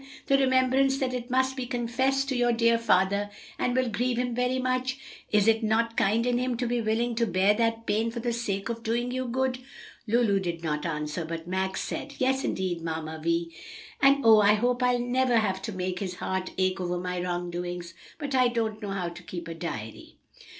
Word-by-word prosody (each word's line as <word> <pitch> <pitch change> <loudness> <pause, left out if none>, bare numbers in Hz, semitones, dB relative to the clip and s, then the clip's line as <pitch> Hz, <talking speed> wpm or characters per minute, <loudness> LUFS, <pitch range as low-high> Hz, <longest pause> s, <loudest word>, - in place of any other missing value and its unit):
the 275 - +3
remembrance 265 +1 +3
that 260 -2 -1
it 245 0 -4
must 260 +1 +1
be 255 -2 -4
confessed 260 +3 0
to 270 - -1
your 240 -1 +3
dear 230 0 +3
father 200 -2 +2 0.3
and 250 - 0
will 255 -1 +2
grieve 240 +2 -1
him 245 0 -1
very 250 +2 0
much? 255 0 -1 0.3
Is 210 0 +3
it 225 0 +4
not 225 +1 +1
kind 225 +3 +2
in 245 -1 +1
him 250 -1 -1
to 245 - -1
be 240 0 0
willing 230 +2 0
to 230 -1 +2
bear 190 +2 +3
that 230 +1 0
pain 225 +2 +1
for 235 +1 -5
the 235 0 -1
sake 200 -4 -2
of 230 0 -4
doing 235 +2 -1
you 255 0 -2
good?" 255 +1 -1 0.5
Lulu 220 -3 +3
did 170 -3 -4
not 150 0 -1
answer, 150 +1 -3
but 165 0 -5
Max 190 +1 -1
said, 280 0 -5
"Yes, 265 +1 +1
indeed, 180 -3 -2
Mamma 160 -1 -4
Vi! 170 0 0 0.5
and 275 -2 +5
oh, 220 -1 +8
I 205 +1 +5
hope 245 +3 0
I'll 250 0 +3
never 245 0 +2
have 190 -4 0
to 220 - -4
make 185 -1 -3
his 185 -3 -4
heart 190 0 -3
ache 185 0 +1
over 180 0 -1
my 180 0 -3
wrongdoings! 175 -1 -4 0.2
But 285 -3 -4
I 255 -1 +5
don't 225 -2 -2
know 205 - -4
how 190 -3 -2
to 175 +1 -11
keep 175 -1 -7
a 165 - -5
diary." 110 -10 -7
230 Hz, 210 wpm, -27 LUFS, 185-250 Hz, 0.5 s, oh